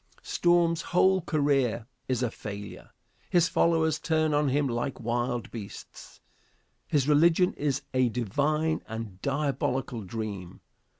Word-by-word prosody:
Storm's 170 -1 +2
whole 190 +1 +3
career 140 -8 +1 0.2
is 130 -1 0
a 120 - 0
failure. 100 -1 -8 0.4
His 175 -1 +4
followers 160 -3 +2
turn 155 -1 +1
on 145 -1 +2
him 145 +2 +1
like 120 +2 -2
wild 120 0 -2
beasts. 105 -4 -10 0.7
His 145 -3 +1
religion 165 +4 +4
is 140 -3 -1
a 130 -1 +3
divine 145 +8 0
and 110 -4 -7
diabolical 140 -4 -1
dream. 100 -3 -6
140 Hz, 120 wpm, -28 LUFS, 115-155 Hz, 0.7 s, His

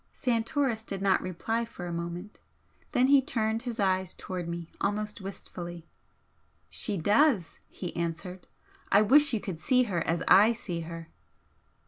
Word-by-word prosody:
Santoris 235 0 0
did 200 -3 -5
not 195 -1 +3
reply 225 +6 -2
for 225 -6 -8
a 175 - -4
moment. 170 +4 -6 0.5
Then 250 - +3
he 275 0 +6
turned 225 -4 -1
his 240 -2 -5
eyes 190 -2 +1
towards 180 -2 -5
me 170 -1 -5
almost 210 +1 -2
wistfully. 175 -3 -8 0.9
"She 210 -4 0
does!" 205 - +2
he 180 -3 -6
answered 170 +2 -4 0.4
"I 205 +2 +6
wish 285 +6 +5
you 225 - 0
could 185 -5 -6
see 255 -1 +3
her 185 -8 -1
as 165 +1 0
I 210 +5 +7
see 180 -7 -5
her!" 165 0 -7
200 Hz, 150 wpm, -29 LUFS, 175-230 Hz, 0.9 s, I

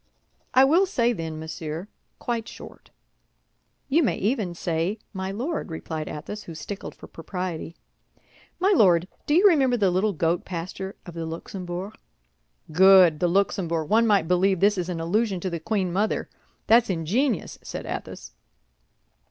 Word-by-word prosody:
I 260 - +8
will 335 +8 +4
say, 240 -9 +1
then, 160 -5 -5
Monsieur, 160 +2 -6 0.3
quite 235 -2 -3
short." - - -12 1.0
"You 300 +5 +3
may 270 - +1
even 205 -5 -1
say, 170 +4 -1 0.2
My 190 -1 -4
Lord," 255 - -3
replied 160 -1 -5
Athos, 165 +8 -6
who 165 - -9
stickled 200 +5 -7
for - - -12
propriety. 170 -1 -6 0.8
"My 385 +3 +3
Lord, 180 - +4 0.2
do 295 - +3
you 380 +4 +7
remember 270 -9 +3
the 195 -4 +2
little 195 +3 +1
goat 165 +1 0
pasture 185 +2 -6
of 175 - -9
the 165 -1 -5
Luxembourg?" 180 +3 -6 0.8
"Good, 185 -2 +6
the 175 - +2
Luxembourg! 170 -3 0
One 225 +1 +4
might 200 -6 +3
believe 185 +1 +2
this 205 +3 +4
is 175 0 -3
an 175 -2 -3
allusion 195 +4 0
to 185 - -3
the 170 - -3
queen 185 0 -1
mother! 205 +4 -1 0.3
That's 230 +1 +5
ingenious," 195 - -1
said - - -7
Athos. - - -6
190 Hz, 150 wpm, -25 LUFS, 170-220 Hz, 1.0 s, I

